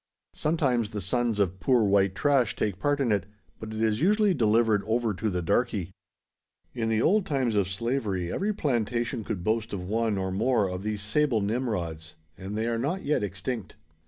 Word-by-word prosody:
Sometimes 135 -8 0
the 105 -1 -4
sons 115 +3 -1
of 95 -2 0
"poor 125 +1 +3
white 100 -2 +3
trash" 135 0 +2
take 100 -3 -2
part 145 +6 +1
in 130 -5 +1
it; 100 -2 0 0.3
but 110 0 -7
it 110 - -5
is 110 +1 +1
usually 210 +2 +4
delivered 110 - +3
over 115 -1 +1
to 110 +3 -2
the 90 -2 -2
"darkey." 100 -1 0 0.8
In 115 -3 -1
the 110 0 +2
old 210 +3 +4
times 130 -7 0
of 100 -3 +2
slavery 100 -4 -2
every 205 +3 0
plantation 120 - -1
could 100 -5 -4
boast 110 +2 -1
of 90 -2 -4
one, 110 0 0
or 95 -1 -2
more, 110 +1 +2
of 90 0 -4
these 105 0 -3
sable 120 +3 +2
Nimrods; 100 -8 -3 0.2
and 95 +3 -6
they 110 - 0
are 115 -1 -1
not 160 +10 -2
yet 150 -4 +1
extinct. 100 +2 -4
110 Hz, 190 wpm, -27 LUFS, 100-125 Hz, 0.8 s, usually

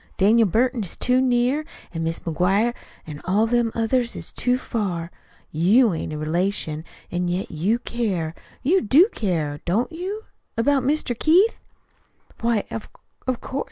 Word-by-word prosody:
Daniel 220 +3 +5
Burton 235 +4 +1
is 185 - -5
too 255 0 +3
near, 255 +3 +2 0.3
an' 165 -1 -3
Mis' 165 0 -2
McGuire 195 +8 +1 0.3
an' 150 -2 -8
all 200 +4 +2
them 235 0 +1
others 235 +1 +1
is - - -4
too 250 0 +1
far. 185 -9 -3 0.4
You 200 +8 +4
ain't 160 - -4
a 155 - -4
relation, 160 0 -1 0.3
an' 175 0 -1
yet 180 +2 -2
you 185 +9 +1
care. 200 -10 -2 0.3
You 365 +8 +3
do 310 - +5
care, 155 -8 -1
don't 215 - 0
you? 380 +6 -5 0.3
about 275 +4 +3
Mr. 275 -1 0
Keith?" 360 - +4 0.8
"Why, 230 -2 +1
of 225 - -5 0.4
of 255 -2 -1
course. 270 - -4
225 Hz, 155 wpm, -23 LUFS, 175-255 Hz, 0.8 s, Daniel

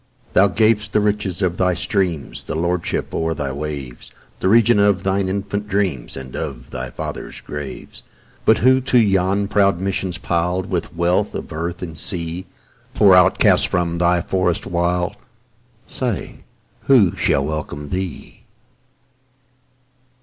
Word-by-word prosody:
Thou 100 - +6
gav'st 110 +1 +1
the - - +4
riches 105 -3 -1
of 90 -1 0
thy 90 -1 +2
streams, 90 -8 -2
The - - -4
lordship 85 +1 -1
o'er 80 0 -1
thy 70 -2 -3
waves, 70 -3 -6 0.3
The - - 0
region 115 0 +5
of 100 -1 +3
thine 95 0 0
infant 100 +1 -3
dreams, 95 -13 -2
And 65 -1 -8
of 65 -2 -6
thy 65 0 -5
fathers' - - -6
graves, 75 -1 -7 0.4
But 110 - +5
who 130 +2 +4
to 130 -1 +2
yon 100 -2 +2
proud 100 -3 +2
mansions 95 -1 -2
pil'd 90 +2 -1
With 90 -1 -3
wealth 85 +2 +1
of - - -6
earth 85 +3 -4
and 80 -3 -6
sea, 85 +2 -1 0.5
Poor 100 -2 +6
outcast 90 +1 +5
from 85 -1 -1
thy 85 0 +3
forest 90 +1 -1
wild, 90 +2 -1 0.7
Say, 120 -7 -4 0.4
who 115 -10 +5
shall 70 - +1
welcome 75 -1 -5
thee? 90 -2 -5
90 Hz, 140 wpm, -20 LUFS, 85-100 Hz, 0.7 s, Thou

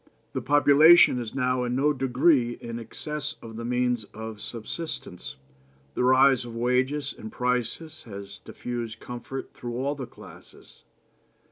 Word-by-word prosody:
The - - -2
population 145 0 +6
is 115 -1 -6
now 125 -1 +1
in 120 0 -1
no 145 +3 +3
degree 130 -1 +2
in 115 0 -6
excess 150 +5 -4
of 115 -1 -10
the 115 - -6
means 125 -1 0
of 110 -1 -7
subsistence. 115 - -6 0.6
The - - -1
rise 130 0 +5
of 120 -1 -8
wages 130 +4 0
and 110 - -9
prices 125 +6 -2
has 100 -3 -9
diffused 120 -2 -6
comfort 125 +2 -7
through 120 -1 -6
all 140 +3 -1
classes. - - -16
125 Hz, 135 wpm, -26 LUFS, 120-140 Hz, 0.6 s, population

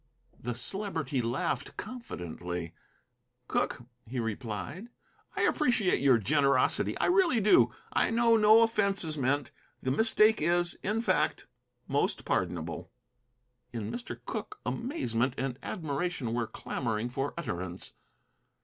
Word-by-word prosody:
The 120 0 -4
Celebrity 150 - -1
laughed 120 +2 -2
confidently. 90 - -6 0.7
"Cooke," - - -1 0.2
he 125 +2 -4
replied, 115 - -4 0.5
"I - - -1
appreciate 240 - +2
your 135 -3 +5
generosity, 140 +5 +2
I - - +1
really 355 - +4
do. 210 0 +5 0.2
I - - +3
know 230 0 +4
no 220 +1 +7
offence 200 -4 +2
is 155 -2 +1
meant. 140 0 0 0.3
The 130 - 0
mistake 220 +5 +4
is, 175 +2 +2
in 215 +3 -1
fact, - - +1 0.4
most - - 0
pardonable." 85 -2 -2 0.8
In 110 -3 -4
Mr. 240 0 -6
Cooke 420 - -5
amazement 130 - -1
and 135 -1 -3
admiration 150 -6 -3
were 120 -1 -1
clamoring 115 -1 -3
for 135 +3 -3
utterance. 95 - -5
140 Hz, 120 wpm, -30 LUFS, -, 0.8 s, no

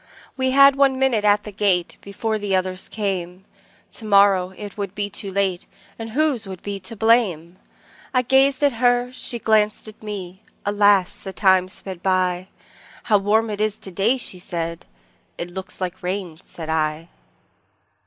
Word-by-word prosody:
We 260 0 0
had 275 +1 +7
one 275 -1 +3
minute 260 -5 +2
at 205 0 +3
the 210 - -8
gate, 190 -4 +1
Before 215 +2 -3
the 200 -2 0
others 185 0 -2
came; 190 -3 -4 0.5
To - - -9
morrow 200 -3 +4
it 205 -1 -8
would 200 -2 -5
be 205 0 -2
too 200 - -6
late, 190 -2 -1 0.3
And 225 0 -5
whose 265 -4 0
would 190 -2 -8
be 200 -1 -4
the 190 +4 -8
blame!I 220 - -1
gazed 270 +2 +3
at 285 - +5
her, 245 0 +3
she 255 -1 -3
glanced 215 -1 +1
at 215 - -12
me; 190 -3 -7 0.2
Alas! 205 -2 +3
the 195 - -6
time 190 -2 +3
sped 185 -1 -9
by:"How 185 +3 -2
warm 215 +3 +1
it 210 0 -4
is 215 -1 0
to 190 - -10
day!" 210 +8 +2
said 170 -6 -4 0.5
she;"It 175 +1 -5
looks 190 +1 -7
like 185 0 -4
rain," 180 -3 -4
said 160 -4 -9
I. 155 +1 -1
200 Hz, 160 wpm, -22 LUFS, 185-220 Hz, 0.5 s, had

